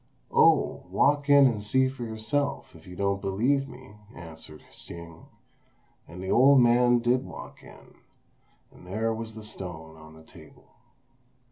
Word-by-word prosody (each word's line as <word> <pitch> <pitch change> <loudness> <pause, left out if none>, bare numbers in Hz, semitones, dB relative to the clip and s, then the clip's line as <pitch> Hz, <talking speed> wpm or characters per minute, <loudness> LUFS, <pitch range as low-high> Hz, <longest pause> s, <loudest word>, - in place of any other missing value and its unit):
"Oh, - - +3
walk 145 0 +1
in 140 -1 +7
and 110 -5 0
see 130 +5 +2
for 130 -2 -7
yourself 120 - -3
if 80 +1 -16
you 90 - -10
don't 100 +1 -1
believe 125 +8 0
me," 125 -4 -14 0.2
answered 80 -2 -11
Hsing; 85 -1 -12 0.8
and 90 +2 -10
the 95 - -3
old 135 +2 +6
man 120 0 +4
did 120 +2 +1
walk - - -11
in, - - -16 0.8
and 90 - -17
there 110 +4 -2
was 110 0 -7
the 110 - -9
stone 85 -6 -7
on 80 0 -15
the 80 - -16
table. - - -18
110 Hz, 150 wpm, -26 LUFS, 90-130 Hz, 0.8 s, in